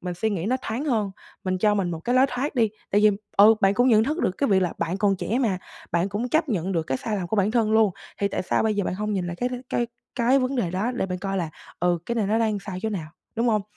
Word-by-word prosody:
Mình 180 -1 -4
suy 220 +5 -1
nghĩ 180 -4 -2
nó 255 +4 +2
thoáng 235 +7 -3
hơn, 220 -8 0 0.3
mình 185 -1 0
cho 210 +2 +3
mình 185 -4 0
một 165 - -4
cái 245 +9 -1
lối 260 +1 +6
thoát 265 +4 -3
đi. 225 -3 +3 0.2
Tại 205 - +3
vì, 210 0 +6 0.3
ừ, 210 +3 +8
bạn 195 0 +4
cũng 245 +3 +3
nhận 220 -2 +5
thức 310 +6 -1
được - - +2
cái 280 - +1
việc 190 -2 +4
là 175 - 0
bạn 170 +3 -1
còn 195 -2 +2
trẻ 225 +6 -1
mà, 215 -8 +1 0.3
bạn 175 +2 +1
cũng 210 +5 -2
chấp 315 +1 +1
nhận 190 -3 -1
được 165 - +1
cái 130 -4 -2
sai 215 -2 -2
lầm 180 - -3
của 220 - -1
bản 200 +1 +2
thân 220 -2 +2
luôn, 220 -2 +5 0.3
thì 200 - +1
tại - - -2
sao - - +1
bây 220 -1 +1
giờ 200 -2 0
bạn - - -2
hông 210 +2 -2
nhìn 185 -3 -1
lại 175 0 -5
cái 245 - -1
đ - - -9 0.2
cái 240 - 0 0.3
cái 250 +2 +3
vấn 260 +1 -1
đề 185 -8 0
đó, 205 +8 -1
để 240 - -1
bạn 180 -1 -4
coi 195 +1 -3
là, 170 -4 -2 0.3
ừ, 175 -1 +2
cái 235 - -1
này 220 -4 0
nó 215 +3 +2
đang 220 -2 +1
sai 190 -2 -6
chỗ 220 - -1
nào, 160 -6 -4 0.3
đúng 235 +1 +2
hông? 215 -2 +2
210 Hz, 310 wpm, -25 LUFS, 185-235 Hz, 0.3 s, ừ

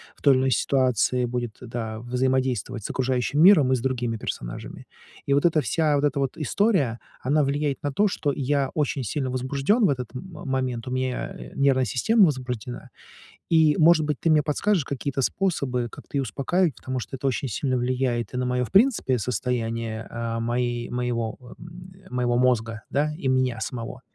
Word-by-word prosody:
в - - -25
той 140 -2 +6
или 130 - +3
иной 130 0 +1
ситуации 125 -2 +2
будет, 120 -2 -4
да, 115 -2 -5
взаимодействовать 125 -2 -1
с - - -5
окружающим 130 +2 0
миром 165 -8 +7
и - - +4
с 125 - -2
другими 120 -2 -1
персонажами. - - -6 0.4
И, - - +4
вот 140 - +3
эта 160 -2 +4
вся, 155 -1 +1
вот 145 - 0
эта 145 -1 +1
вот 135 -1 -1
история, 155 - +1 0.3
она 145 +3 +3
влияет 140 0 0
на 145 - -1
то, 210 +8 +3
что 145 -6 -1
я 140 -1 0
очень 145 -3 0
сильно 130 +4 -2
возбуждён 140 - +1
в - - +4
этот 125 -4 -3
м 125 - -5 0.2
момент, 130 -3 -2
у - - -4
меня, 130 0 -2
э, - - -9
нервная 135 -2 +3
система 195 - +4
возбуждена, 125 -4 -4 0.6
и, 160 -2 +5
может 160 -1 +5
быть, 150 -2 -1
ты 165 - 0
мне 155 -1 +5
подскажешь 165 +3 +1
какие-то 135 0 -3
способы, 135 -7 0
как-то 140 - -7
её 135 - +1
успокаивать. 145 - 0
Потому 130 +1 -4
что, 130 - -6
это 135 +1 -2
очень 135 +1 -1
сильно 130 +4 -1
влияет 125 -2 -1
и - - -3
на 125 - 0
моё, 125 0 0
в - - -13
принципе, 195 - +3
состояние, 115 -2 -2
э, 115 -1 -3
моей, 120 0 -1
моего, 120 -2 -2 0.2
м, 175 +2 -11
э, - - -15
моего 125 -1 +1
мозга, 115 -3 +1
да, 150 +2 0
и 135 -6 -1
меня 130 -3 +1
самого, 120 +2 -5
130 Hz, 190 wpm, -25 LUFS, 120-145 Hz, 0.6 s, миром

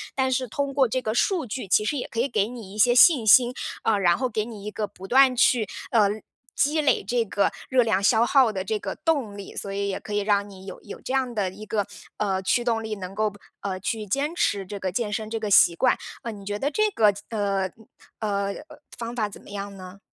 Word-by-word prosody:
但 265 -1 +1
是 255 0 0
通 280 +4 -3
过 270 -1 +3
这 255 +3 -1
个 215 -3 -2
数 335 - +1
据 245 -1 -5
其 210 +3 +3
实 290 - -1
也 250 - -4
可 230 - -5
以 245 - +2
给 210 -6 0
你 225 -5 -9
一 - - -9
些 240 +3 +5
信 265 -3 +7
心。 245 +3 +7 0.3
呃， 220 -2 +2
然 175 -3 +3
后 255 - 0
给 215 -2 -1
你 220 -4 -9
一 210 - -4
个 210 0 -3
不 190 -1 -12
断 260 +2 +5
去 235 -3 +3 0.2
呃， 215 -3 +5 0.5
积 305 +2 +2
累 290 - +2
这 235 +4 0
个 200 -1 +1 0.2
热 255 -1 +4
量 220 -4 +1
消 220 +3 +4
耗 260 -3 +4
的 190 -3 -3
这 215 +3 -1
个 - - -5
动 270 -11 -1
力。 200 - -9
所 200 - -5
以 200 0 -2
也 190 - -3
可 210 - -8
以 205 - +1
让 205 0 +1
你 190 -1 -13
有 190 - -9
有 205 - -10
这 255 - -5
样 260 -2 0
的 205 -4 -1
一 210 +3 -10
个， 210 -1 -1 0.3
呃， 195 -2 0
驱 240 +6 +1
动 230 -2 0
力， 220 -1 -4
能 190 -2 -7
够 215 0 +1
不 205 0 -16 0.2
呃， 190 -2 -3
去 215 +3 -3
坚 275 - -1
持 200 - 0
这 200 +2 -7
个 185 -1 -2
健 210 +2 -2
身 215 +1 -3
这 225 0 -3
个 215 -1 -3
习 175 -3 +6
惯。 255 +8 +2 0.3
呃， 230 - -4
你 200 -2 -10
觉 205 +1 -3
得 285 +5 -1
这 430 +7 +2
个 215 - +4
怎 205 +1 -11
呃， 200 -3 0
嗯 225 +4 -20 0.3
呃， 200 -2 -1 0.4
方 235 0 -5
法 215 -4 -1
怎 - - -12
么 - - -16
样 200 0 -6
呢？ 185 +1 -11
215 Hz, 275 characters per minute, -25 LUFS, 200-245 Hz, 0.5 s, 信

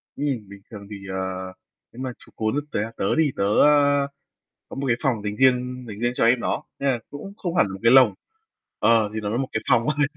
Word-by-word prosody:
Ừm, 145 - -3 0.2
bình 100 0 -12
thường 100 -2 -9
thì, 105 - -7 0.2
ờ, 95 - -3 0.7
nếu 125 - -10
mà 130 - -3
chú - - -18
cún 110 +6 0
tớ - - -1 0.2
tớ 95 - 0
đi, 155 -3 +2
tớ, 100 - -1 0.2
a, 145 -1 +4 0.6
có - - -9
một 135 0 -3
cái 115 -2 +2
phòng 115 -6 0
dành 105 0 -3
riêng 125 0 +2
dành 105 0 -8
riêng 120 +1 +1
cho 115 - +1
em 120 +1 +4
nó. - - -2 0.2
Nên 140 - 0
là 120 - 0
cũng 170 +8 -8
không 175 -3 -4
hẳn 100 - +3
một 95 - -7
cái 115 +2 +5
lồng. 130 -6 +7 0.6
Ờ, 110 -3 +3
thì 110 - -2
nó 105 -1 -3
là 115 - -1
một 130 0 -1
cái 110 - -2
phòng 115 0 +3
thôi. 145 -1 +3
125 Hz, 240 wpm, -23 LUFS, 110-140 Hz, 0.7 s, lồng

